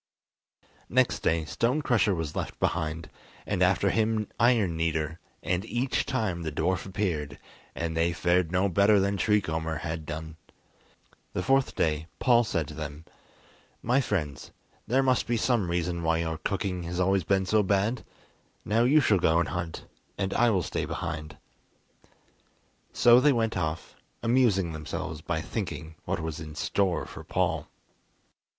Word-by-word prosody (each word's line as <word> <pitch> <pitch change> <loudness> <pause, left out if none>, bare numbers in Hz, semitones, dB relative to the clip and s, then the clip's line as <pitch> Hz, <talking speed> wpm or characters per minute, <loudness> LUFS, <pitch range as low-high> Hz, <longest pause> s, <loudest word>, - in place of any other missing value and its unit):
Next - - +2
day 80 -1 +1
Stone 125 - 0
Crusher 110 -7 +2
was 80 -3 -4
left - - -4
behind, 80 -1 -1 0.4
and - - -2
after - - +3
him 110 -1 +1
Iron 115 -8 +3
Kneader, 80 -1 -1 0.2
and 90 +3 0
each 120 +3 -1
time 110 -10 -1
the 80 -2 -3
dwarf 90 +5 -1
appeared, 80 -8 -2 0.4
and 80 -1 -3
they 85 +1 +2
fared 85 0 +1
no 90 +2 +2
better 100 +3 +4
than 100 +1 +1
Tree 105 +2 +2
Comber 80 -1 -3
had 80 -1 -4
done. 80 +1 -6 1.0
The - - -2
fourth 135 0 +2
day 80 0 0
Paul 120 -2 +4
said 80 -8 -1
to - - -8
them: 75 +1 -7 0.8
"My 125 +4 +3
friends, 80 - -3 0.4
there 130 +4 +3
must 130 -2 +2
be 120 0 +1
some 115 -6 +1
reason 85 0 -1
why 80 0 +1
your 80 -1 -2
cooking 95 -2 -2
has 85 +1 -4
always 95 0 +2
been 95 +2 +1
so 105 +3 +3
bad, 100 +5 0 0.6
now 115 +3 +2
you 145 +5 +5
shall 105 -7 +3
go 85 0 +3
and 85 - 0
hunt 85 -2 -4 0.3
and 95 -1 -1
I 120 0 +4
will 95 -5 +1
stay - - -2
behind." 75 -1 -5 1.5
So 120 0 +6
they 145 +2 +4
went 115 -2 0
off, 80 -2 -3 0.3
amusing 115 -8 +3
themselves 80 0 -5
by 80 0 -2
thinking 85 -4 -5
what - - -1
was 80 0 -4
in 75 -1 -8
store 90 +2 0
for - - -10
Paul. - - -1
90 Hz, 155 wpm, -28 LUFS, 80-110 Hz, 1.5 s, So